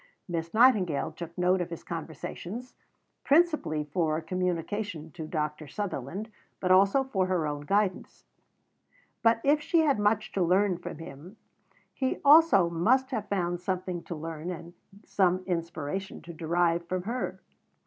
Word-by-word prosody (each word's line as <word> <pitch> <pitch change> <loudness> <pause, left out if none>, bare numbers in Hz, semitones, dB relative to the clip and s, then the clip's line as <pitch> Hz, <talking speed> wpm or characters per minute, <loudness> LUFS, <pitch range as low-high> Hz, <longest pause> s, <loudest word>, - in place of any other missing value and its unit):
Miss 165 -2 -3
Nightingale 215 - +3
took 170 +2 -9
note 180 +1 +2
of 175 - -3
his 170 - -7
conversations, 175 - -6 0.5
principally 300 - +2
for 155 +1 0
communication 180 0 -3
to 160 -2 -7
Dr. 150 -1 -3
Sutherland, 195 - -5 0.3
but 185 - 0
also 195 +8 +5
for 195 -8 -1
her 180 -4 0
own 145 -1 -3
guidance. 200 0 -1 1.0
But 230 0 +3
if 295 +2 +3
she 330 +2 +2
had 285 -7 +2
much 210 +1 +1
to 195 - -1
learn 185 +1 +2
from 170 - -7
him, 165 +6 -11 0.6
he 260 -1 -1
also 290 - +7
must 245 +11 +2
have 220 -5 -3
found 175 -3 -1
something 185 -1 -3
to 170 - -5
learn, 160 +1 -6
and 170 -1 -7 0.3
some 185 -1 +1
inspiration 170 +1 -4
to 170 - -9
derive, 170 +1 0
from 185 0 -2
her. 235 +5 -3
180 Hz, 145 wpm, -28 LUFS, 165-210 Hz, 1.0 s, also